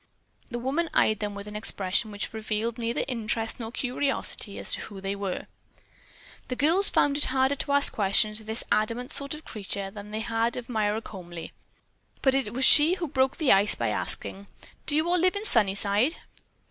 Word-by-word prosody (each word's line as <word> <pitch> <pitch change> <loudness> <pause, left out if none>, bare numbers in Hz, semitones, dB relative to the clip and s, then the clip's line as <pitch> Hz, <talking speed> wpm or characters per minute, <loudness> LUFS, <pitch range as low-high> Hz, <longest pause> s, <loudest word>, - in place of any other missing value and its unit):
The 240 - -4
woman 280 +8 -2
eyed 215 -1 +3
them 205 -1 -4
with 200 0 -8
an 210 0 -9
expression 205 0 0
which 205 +1 -5
revealed 220 +1 -3
neither 235 +1 -2
interest 225 -2 -2
nor 225 -1 -6
curiosity 255 -5 -2
as - - 0
to - - -2
who 200 -2 -9
they 195 +1 -4
were. 200 -2 -4 1.0
The 250 - -3
girls 330 +9 +3
found 285 0 +2
it - - +6
harder 265 +1 +2
to 280 +1 -3
ask 285 0 +5
questions 215 +1 +1
of 220 - -11
this 220 +1 +1
adamant 230 +4 0
sort 280 +1 +1
of 305 - -10
a - - -32
creature 200 -2 -5
than 205 0 -10
they 215 +1 -4
had 230 +1 -1
of 245 -1 -7
Myra 215 -1 -1
Comely. 175 -4 -9 0.7
But 265 - +4
she 270 - +3
it 215 -6 -5
was 260 +3 +7 0.2
who 340 - -3
broke 265 -1 0
the 310 -6 +2
ice 200 +1 +5
by 115 -2 -2
asking, 195 - -1 0.4
"Do 295 - +2
you 315 +2 +2
all 355 +1 +2
live 365 +3 +2
in 405 +2 -3
Sunnyside?" 205 - +3
225 Hz, 200 wpm, -26 LUFS, 205-265 Hz, 1.0 s, was